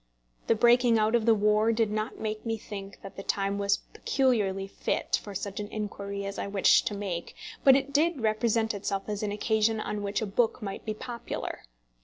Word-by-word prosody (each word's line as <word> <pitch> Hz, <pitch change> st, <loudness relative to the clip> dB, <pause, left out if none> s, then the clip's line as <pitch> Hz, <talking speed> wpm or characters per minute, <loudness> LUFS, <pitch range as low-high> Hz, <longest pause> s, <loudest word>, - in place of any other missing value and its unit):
The 230 Hz, -, +4 dB
breaking 240 Hz, +1 st, +5 dB
out 215 Hz, +1 st, +2 dB
of 235 Hz, -1 st, +2 dB
the 225 Hz, -, +6 dB
war 210 Hz, +2 st, +3 dB
did 225 Hz, -2 st, +1 dB
not 215 Hz, +2 st, -2 dB
make 215 Hz, 0 st, -3 dB
me 225 Hz, -1 st, -2 dB
think 200 Hz, -2 st, -9 dB
that 195 Hz, -, -10 dB
the -, -, -4 dB
time 200 Hz, 0 st, -1 dB
was 200 Hz, 0 st, +2 dB, 0.2 s
peculiarly 210 Hz, -8 st, +1 dB
fit 195 Hz, -, -1 dB
for 205 Hz, -2 st, -9 dB
such 200 Hz, +2 st, -4 dB
inquiry 205 Hz, -1 st, -4 dB
as 200 Hz, 0 st, -5 dB
I -, -, -2 dB
wished 200 Hz, -1 st, +4 dB
to 205 Hz, -, -2 dB
make, 190 Hz, -4 st, -4 dB, 0.3 s
but 270 Hz, -1 st, +8 dB
it 275 Hz, +1 st, -1 dB
did 315 Hz, +1 st, +2 dB
represent 220 Hz, 0 st, +1 dB
itself 195 Hz, -1 st, -2 dB
as 210 Hz, -1 st, -3 dB
an 210 Hz, -1 st, -1 dB
occasion 220 Hz, +1 st, +1 dB
on 210 Hz, -1 st, -3 dB
which 200 Hz, 0 st, -1 dB
a 220 Hz, -, -2 dB
book 220 Hz, +4 st, +1 dB
might 200 Hz, -4 st, -6 dB
be 215 Hz, -1 st, -2 dB
popular. 235 Hz, +1 st, -5 dB
215 Hz, 200 wpm, -28 LUFS, 200-225 Hz, 0.3 s, but